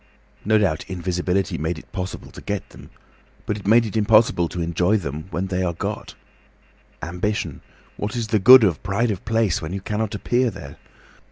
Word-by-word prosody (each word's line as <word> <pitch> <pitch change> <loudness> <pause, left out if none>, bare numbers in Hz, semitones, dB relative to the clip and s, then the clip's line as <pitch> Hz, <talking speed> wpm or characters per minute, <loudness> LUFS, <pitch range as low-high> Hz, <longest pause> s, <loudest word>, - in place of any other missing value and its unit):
No 110 +1 +3
doubt 90 -6 0
invisibility 90 +1 -1
made 80 +2 -2
it - - -13
possible 95 -1 -6
to - - -11
get - - -4
them, - - -14 0.6
but 105 - -1
it 100 -2 -8
made 115 +2 +5
it 110 - -6
impossible 110 -4 +3
to 90 - -6
enjoy 85 +5 +1
them 75 -4 -5
when 90 +1 -2
they 95 -1 -2
are 90 -2 0
got. - - -5 0.9
Ambition—what 105 +3 -5
is 115 -2 -3
the 110 - +2
good 125 +5 +9
of 90 -9 +1
pride 105 +4 0
of 95 - -5
place 110 -4 +1
when 80 +2 -5
you 100 - -4
cannot 105 +2 -2
appear 120 +4 +1
there? 70 -10 -10
95 Hz, 180 wpm, -22 LUFS, 90-110 Hz, 0.9 s, good